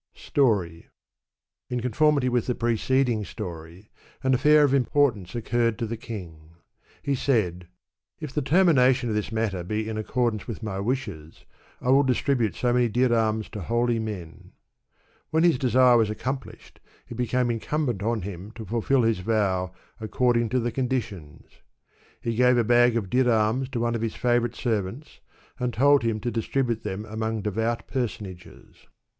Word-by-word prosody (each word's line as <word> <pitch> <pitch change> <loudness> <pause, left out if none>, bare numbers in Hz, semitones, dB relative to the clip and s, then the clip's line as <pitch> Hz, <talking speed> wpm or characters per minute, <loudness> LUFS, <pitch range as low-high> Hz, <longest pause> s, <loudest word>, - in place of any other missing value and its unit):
Story. 100 - 0 0.8
In 125 - -2
conformity 140 +3 +2
with 125 -2 0
the 125 - 0
preceding 120 0 +1
story, 85 -1 -9 0.3
an 130 0 +2
afEur 150 +3 +5
of 140 -2 +3
importance 125 -7 +1
occurred 115 0 0
to 120 - -2
the 115 +1 -4
king. 85 -9 -9 0.5
He 140 - 0
said, 95 -10 0 0.3
" 65 0 -55
If 150 -4 -7
the 150 - 0
termination 135 -6 +3
of 110 - -1
this 105 0 -2
matter 110 -5 -2
be 110 +4 -3
in 110 -1 -3
accordance 115 -1 -1
with 115 -1 -6
my 100 -3 -4
wishes, 100 - -4 0.3
I 125 - -3
will 135 +2 +6
distribute 125 - 0
so 120 -1 0
many 120 -1 +2
dirams 110 -2 +1
to 105 - -6
holy 120 +4 0
men." 100 -7 -7 0.8
When 160 +1 +2
his 170 -7 +3
desire 125 -1 +5
was 110 -2 +2
accomplished, 130 +5 -6 0.3
it - - -8
became 125 +1 0
incum 145 +7 -1
bent 120 -7 -2
on 110 -1 -1
him 95 0 -7
to 115 -1 -8
fulfil 120 +5 +1
his 115 -4 +1
vow 95 -3 0 0.3
according 120 +1 +1
to 130 - +1
the 120 0 -1
condi 130 +1 0
tions. 80 -8 -12 0.7
He 115 - -2
gave 125 +2 +4
a 120 - +3
bag 120 +1 +4
of 100 -5 -4
dirams 125 0 +2
to 130 -3 -3
one 120 0 0
of 115 - -2
his 115 -1 -2
&vorite 120 -1 +1
servants, 115 +4 -3 0.4
and 125 -1 -1
told 140 +4 +4
him 115 -2 -1
to 120 - -2
distribute 115 0 -1
them 100 +3 -5
among 110 0 -3
devout 110 +3 -1
personages. 105 -8 -6
115 Hz, 165 wpm, -25 LUFS, 105-125 Hz, 0.8 s, will